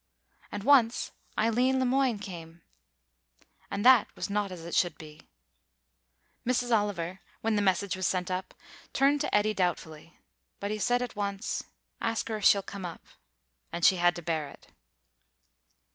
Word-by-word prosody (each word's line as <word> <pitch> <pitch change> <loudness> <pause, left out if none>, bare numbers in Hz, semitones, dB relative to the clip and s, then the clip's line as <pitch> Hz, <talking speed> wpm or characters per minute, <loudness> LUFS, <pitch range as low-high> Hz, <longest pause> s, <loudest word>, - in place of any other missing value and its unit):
And 205 -1 -5
once 245 -3 +4 0.3
Eileen 245 +4 +2
Le 260 - +1
Moine 255 -2 +2
came, 170 -4 -9 1.1
and 200 +2 -3
that 255 -4 +7
was - - -4
not 205 -1 -1
as 170 -2 -8
it 170 - -7
should 175 -3 +2
be. 155 -1 -13 1.1
Mrs. 245 -1 +1
Oliver, 190 -4 -2 0.2
when 225 -1 +1
the 205 - +2
message 190 -1 +1
was 185 -1 -1
sent 180 0 -1
up, 185 0 -4 0.4
turned 280 +1 +3
to - - 0
Eddy 210 +1 +3
doubtfully; 170 -4 -3 0.4
but 200 +1 -3
he 215 - -3
said 245 +4 +2
at 245 - -6
once, 200 0 -3 0.4
"Ask 225 0 -1
her 220 - -1
if 205 - -4
she'll 200 -1 +6
come 200 0 -8
up," 175 -2 -7 0.7
and 170 - 0
she 190 - +6
had 175 0 +3
to 175 - -7
bear 155 -3 -1
it. - - -17
200 Hz, 160 wpm, -29 LUFS, 175-230 Hz, 1.1 s, that